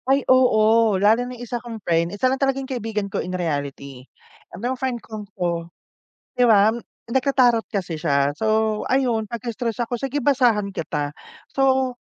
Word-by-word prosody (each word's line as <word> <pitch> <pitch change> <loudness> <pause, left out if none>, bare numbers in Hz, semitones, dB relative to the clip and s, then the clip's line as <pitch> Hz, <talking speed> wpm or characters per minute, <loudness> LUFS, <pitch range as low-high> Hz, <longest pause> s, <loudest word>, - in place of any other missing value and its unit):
Ay, 270 0 +3
oo, 225 -4 +4
lalo 220 +5 +3
na 250 - -8
'yung 245 - -7
isa 240 0 -4
kong 235 -2 -7
friend, 170 0 +1
isa 205 +6 -2
lang 260 +1 +1
talaga 270 -1 +2
'yung 270 - -4
kaibigan 225 -5 -3
ko 200 - -3
in 185 0 -4
reality, 140 -5 -4 0.4
'tong 245 +6 -3
friend 260 -2 -2
kong 215 -3 -9
'to, 170 -2 -2 0.7
'di 250 - +5
ba, 210 -2 +6 0.4
nagta-tarot 250 -3 +3
kasi 180 -5 -4
siya, 140 -3 +1
so 220 -1 +1
ayun 245 -5 +1
pagka 235 +2 -5
stressed 235 0 -3
ako, 240 +1 -3
"Sige, 270 +3 -3
basahan 240 -7 +2
kita." 150 -5 -3 0.4
So, 265 -1 +2
225 Hz, 170 wpm, -22 LUFS, 195-250 Hz, 0.7 s, ba